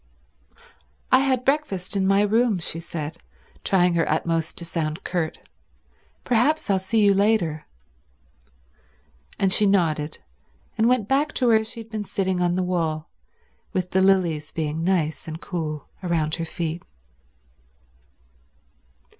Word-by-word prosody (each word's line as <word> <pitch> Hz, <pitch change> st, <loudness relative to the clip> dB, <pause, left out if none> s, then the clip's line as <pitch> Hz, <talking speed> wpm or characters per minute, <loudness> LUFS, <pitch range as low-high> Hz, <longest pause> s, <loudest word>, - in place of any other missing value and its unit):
"I 260 Hz, -, +7 dB
had 265 Hz, -2 st, +1 dB
my -, -, -24 dB
breakfast 265 Hz, -10 st, 0 dB
in 190 Hz, -1 st, +1 dB
my 195 Hz, +1 st, +4 dB
room," 220 Hz, 0 st, +2 dB
she 165 Hz, -1 st, -4 dB
said, 160 Hz, -1 st, -6 dB, 0.5 s
trying 180 Hz, -2 st, +3 dB
her 165 Hz, -1 st, +1 dB
utmost 165 Hz, +1 st, 0 dB
to 170 Hz, -, -6 dB
sound 160 Hz, -2 st, -3 dB
curt. 170 Hz, -3 st, -2 dB, 0.9 s
"Perhaps 250 Hz, +1 st, +2 dB
I'll 190 Hz, -, +3 dB
see 215 Hz, +4 st, +1 dB
you 200 Hz, -, +6 dB
later." 195 Hz, -7 st, +1 dB, 1.7 s
And 190 Hz, -1 st, +2 dB
she 210 Hz, -, +5 dB
nodded, 155 Hz, -6 st, +1 dB, 0.6 s
and 225 Hz, -, +3 dB
went 250 Hz, -5 st, +2 dB
back 285 Hz, +4 st, +1 dB
to 255 Hz, -, 0 dB
where 220 Hz, -2 st, +4 dB
she 230 Hz, +1 st, -8 dB
had 225 Hz, 0 st, -14 dB
been 215 Hz, -2 st, -3 dB
sitting 190 Hz, -2 st, -1 dB
on 175 Hz, 0 st, +2 dB
the 185 Hz, -, 0 dB
wall, 165 Hz, -4 st, -2 dB, 0.6 s
with 180 Hz, -1 st, -2 dB
the 190 Hz, -, +3 dB
lilies 175 Hz, -6 st, +2 dB
being 160 Hz, 0 st, -2 dB
nice 165 Hz, -5 st, 0 dB
and 160 Hz, 0 st, -6 dB
cool 155 Hz, -6 st, -4 dB
round 165 Hz, -4 st, 0 dB
her 165 Hz, 0 st, -2 dB
feet. 165 Hz, 0 st, -4 dB
180 Hz, 140 wpm, -24 LUFS, 165-215 Hz, 1.7 s, I